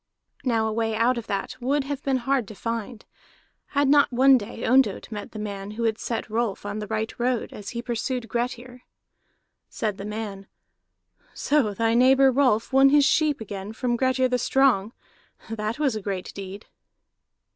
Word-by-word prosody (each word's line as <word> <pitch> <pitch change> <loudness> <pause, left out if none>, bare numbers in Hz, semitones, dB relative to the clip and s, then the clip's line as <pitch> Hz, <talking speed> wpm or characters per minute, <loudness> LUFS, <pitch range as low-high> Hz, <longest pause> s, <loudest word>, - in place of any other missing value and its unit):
Now 230 -4 +1
a 220 - -1
way 225 0 -1
out 235 +2 +2
of 230 - -10
that 195 -1 -3
would 275 +3 +1
have 280 0 -4
been 270 -2 +1
hard 255 -2 0
to 215 - -10
find, 230 +1 -5 0.7
had 285 -1 +4
not 285 0 +5
one 265 +2 +6
day 230 0 -3
Ondott 250 -4 +2
met 205 -1 -6
that - - -9
man 200 -2 -5
who 235 - -2
had 225 -1 0
set 230 - -3
Rolf 220 -2 -2
on 205 +1 -4
the 210 - -5
right 220 +1 -2
road 245 -1 -1
as 200 -1 -8
he 235 -1 -5
pursued 240 0 -3
Grettir. 245 +1 -4 0.9
Said 210 -3 -3
the 195 - -5
man: 210 -2 -6 0.9
"So 260 -9 +1
thy 225 +2 +1
neighbor 265 +2 +5
Rolf 255 -3 +2
won 270 +1 +7
his 290 0 +5
sheep 300 -2 +2
again 200 0 -6
from 240 +1 -1
Grettir 260 +1 +2
the 250 0 0
Strong. 245 -5 +2 0.6
That 215 +1 -3
was 285 -6 +1
a 215 - -4
great 190 -2 -4
deed!" 195 +1 -8
235 Hz, 180 wpm, -25 LUFS, 215-260 Hz, 0.9 s, won